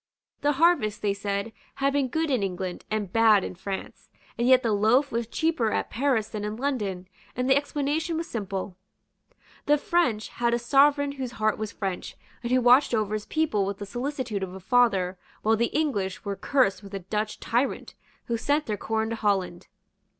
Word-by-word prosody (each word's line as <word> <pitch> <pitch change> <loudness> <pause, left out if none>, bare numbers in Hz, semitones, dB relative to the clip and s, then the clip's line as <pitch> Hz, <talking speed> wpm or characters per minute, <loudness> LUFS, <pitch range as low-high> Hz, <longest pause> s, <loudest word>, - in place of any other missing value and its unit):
The 290 0 +2
harvest, 265 -9 +2
they 205 -1 +2
said, 200 +2 -3 0.2
had 275 0 +1
been 280 -2 +1
good 320 +4 -1
in 250 -5 +2
England 185 -1 -4
and 210 -4 -2
bad 220 -3 +5
in - - -5
France; 190 +2 -7 0.3
and 235 - 0
yet 255 0 +6
the 230 - +1
loaf 220 +7 +3
was 230 0 -2
cheaper 315 -4 0
at - - -2
Paris 245 -4 +1
than 210 -2 -5
in 210 +1 -3
London; 210 -9 -2 0.3
and 250 +1 -1
the 265 - +5
explanation 295 +3 -1
was 330 - -3
simple. 195 -3 -4 0.9
The 295 +1 +5
French 285 -9 0
had 235 0 0
a - - +1
sovereign 280 +4 +3
whose 260 -3 -5
heart 215 -2 0
was 215 -1 -3
French, 190 -3 -5 0.2
and 240 0 -4
who 255 0 +4
watched 250 +1 +5
over 215 -1 0
his 215 -1 -3
people 310 -11 +1
with 195 0 -3
the 205 - -6
solicitude 245 -2 -3
of 190 -1 -5
a - - -7
father, 190 -4 +2 0.2
while 220 +1 +4
the 235 +2 +1
English 210 -13 -2
were 200 -1 -2
cursed 200 -6 +1
with 200 -1 -9
a - - -3
Dutch 215 +2 -2
tyrant, 245 +4 -1 0.3
who 235 - -1
sent 290 +6 0
their 210 -3 -2
corn 220 +1 -1
to - - -1
Holland. 195 -5 -1
225 Hz, 195 wpm, -26 LUFS, 200-275 Hz, 0.9 s, yet